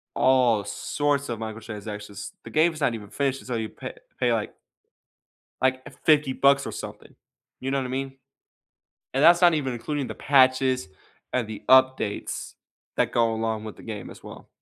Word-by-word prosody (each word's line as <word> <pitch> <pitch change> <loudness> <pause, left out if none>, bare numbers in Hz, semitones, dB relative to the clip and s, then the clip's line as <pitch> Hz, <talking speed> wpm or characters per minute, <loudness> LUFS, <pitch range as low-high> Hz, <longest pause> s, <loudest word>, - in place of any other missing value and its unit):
all 125 -5 +4
sorts 140 +6 -1
of 115 -2 -3
microtransactions. 105 -2 -7
The - - -9
game's 155 0 +2
not 120 -4 +2
even 105 -2 -9
finished 135 -1 -1
until 125 -2 -3
you 110 - -3
pay - - -8 0.3
pay, 120 -2 +3
like 110 -2 -2 1.1
like, 130 0 +2 0.2
$50 150 -4 +4
bucks 140 +1 +3
or - - -4
something. - - -8 0.5
You 135 +1 -3
know 140 - +1
what 135 - -1
I - - -4
mean? 135 +1 -4 1.0
And 135 +3 +3
that's 170 +1 +7
not 175 -2 +6
even 135 -4 -1
including 135 +3 -3
the - - -6
patches 130 -3 +3 0.4
and 120 -4 0
the 110 - -7
updates 130 -5 +3 0.5
that - - +2
go 115 -1 +3
along 110 -1 -2
with 110 - -8
the - - -13
game 105 -4 -7
as - - -13
well. - - -11
130 Hz, 170 wpm, -25 LUFS, 110-140 Hz, 1.1 s, that's